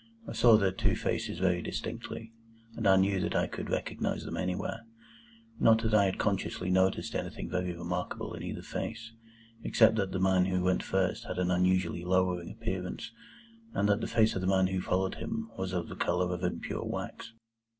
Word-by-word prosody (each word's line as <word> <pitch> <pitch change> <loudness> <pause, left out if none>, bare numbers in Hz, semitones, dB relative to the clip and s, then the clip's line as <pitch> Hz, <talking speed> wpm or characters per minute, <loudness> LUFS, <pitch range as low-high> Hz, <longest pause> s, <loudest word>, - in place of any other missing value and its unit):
I - - -5
saw 115 -3 +7
their 100 -3 +2
two 95 - +1
faces - - -2
very 90 -1 +2
distinctly, 115 +5 -5 0.4
and 110 -3 0
I 95 - +7
knew 95 0 +3
that 90 - -1
I - - +3
could - - -6
recognise - - -2
them - - -4
anywhere. 90 +4 -2 0.8
Not 115 0 +5
that 110 -1 0
I 105 -2 +6
had 95 - 0
consciously 95 -2 -1
noticed 95 +1 +2
anything - - -4
very 90 0 -1
remarkable 90 +1 -4
in - - -7
either - - -5
face, 115 0 -5 0.5
except 110 - +4
that 95 -3 0
the 95 - -2
man 95 -1 +4
who 90 -1 0
went 90 0 +2
first 95 -1 0
had - - -5
an 90 0 +1
unusually 90 -1 +2
lowering 90 -1 +1
appearance, 95 +1 -4 0.6
and 100 - +2
that 105 +2 +3
the - - -2
face 110 -1 +3
of 95 - -2
the 95 - -1
man 95 -1 +4
who 95 0 -1
followed 95 +1 0
him 225 0 -4
was 95 -1 -3
of 90 -2 -2
the - - -7
colour 90 +1 0
of 90 - -4
impure - - -2
wax. - - -5
95 Hz, 190 wpm, -30 LUFS, 90-100 Hz, 0.8 s, saw